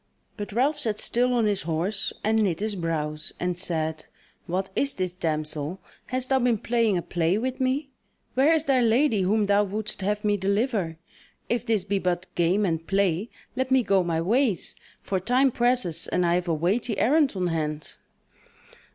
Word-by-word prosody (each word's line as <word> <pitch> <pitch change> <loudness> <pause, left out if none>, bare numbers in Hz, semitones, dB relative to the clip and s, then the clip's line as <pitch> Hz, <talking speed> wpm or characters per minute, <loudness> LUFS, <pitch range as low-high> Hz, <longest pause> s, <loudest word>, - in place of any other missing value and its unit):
But 205 -1 -6
Ralph 265 +8 +1
sat 215 -2 -2
still 245 +1 +2
on 240 -3 +2
his 205 -2 +1
horse, 170 +6 -1
and 220 +1 +2
knit 180 -6 0
his 215 +1 -1
brows, 155 -4 -2
and 180 0 -1
said: 160 -3 -2 0.4
"What 190 +2 -2
is 280 0 +1
this, 185 -2 -2
damsel? 155 0 -3 0.3
hast 255 0 0
thou 265 -1 +3
been 240 -2 +2
playing 230 -3 +1
a 175 - -2
play 175 +2 0
with 255 +4 -3
me? 270 +2 0 0.4
Where 270 +5 +4
is 320 -1 +2
thy 265 -2 +3
lady 230 -1 +3
whom 205 +3 +2
thou 200 +1 +3
wouldst 210 +1 -4
have 210 +2 -1
me 205 0 +2
deliver? 200 -3 0 0.5
If 235 - -1
this 220 -4 +1
be 200 0 -1
but 180 -1 -1
game 180 +4 +2
and 165 -2 -2
play, 195 +1 +1 0.3
let 260 0 -1
me 260 -1 +4
go 195 -3 +3
my 165 -2 -1
ways; 220 +1 +1 0.3
for 190 - -1
time 255 +7 +3
presses, 240 -10 +1
and 180 - +1
I 170 - +2
have 180 0 0
a 170 - +1
weighty 200 +7 0
errand 295 +3 +3
on 185 -1 -1
hand." 155 -2 -3
200 Hz, 185 wpm, -25 LUFS, 175-240 Hz, 0.5 s, Where